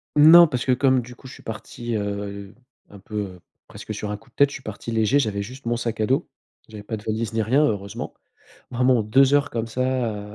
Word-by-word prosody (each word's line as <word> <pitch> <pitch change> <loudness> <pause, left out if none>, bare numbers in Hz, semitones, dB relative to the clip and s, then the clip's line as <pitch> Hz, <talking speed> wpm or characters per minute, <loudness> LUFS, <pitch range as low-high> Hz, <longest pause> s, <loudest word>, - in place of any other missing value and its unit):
Non 165 +3 +9
parce 125 -4 -3
que 130 - +2
comme 130 0 +3
du 125 +1 -11
coup 130 - -14
je 130 - -10
suis - - -14
parti, 115 +1 -6
heu, 100 -1 -5 0.3
un 100 - -13
peu 100 -2 -6 0.3
presque - - -8
sur 105 - -5
un 105 - -3
coup 125 - -23
de - - -51
tête, 140 0 +4
je - - -8
suis 130 - -9
parti 110 +2 -7
léger. 115 +5 +2
J'avais 105 -6 -1
juste 130 +5 -11
mon 120 0 0
sac 115 -1 -3
à 110 - +1
dos, 135 +7 +1 0.4
j'avais 110 -2 -10
pas 110 +1 -4
de 105 - -12
valise 110 +1 -3
ni 110 0 +1
rien, 130 +8 +3
heureusement, 100 -7 -3 0.6
vraiment 125 -1 +2
2 130 +6 +4
heures 145 0 +3
comme 115 -1 -3
ça 115 -4 -2
115 Hz, 230 wpm, -23 LUFS, 105-130 Hz, 0.6 s, Non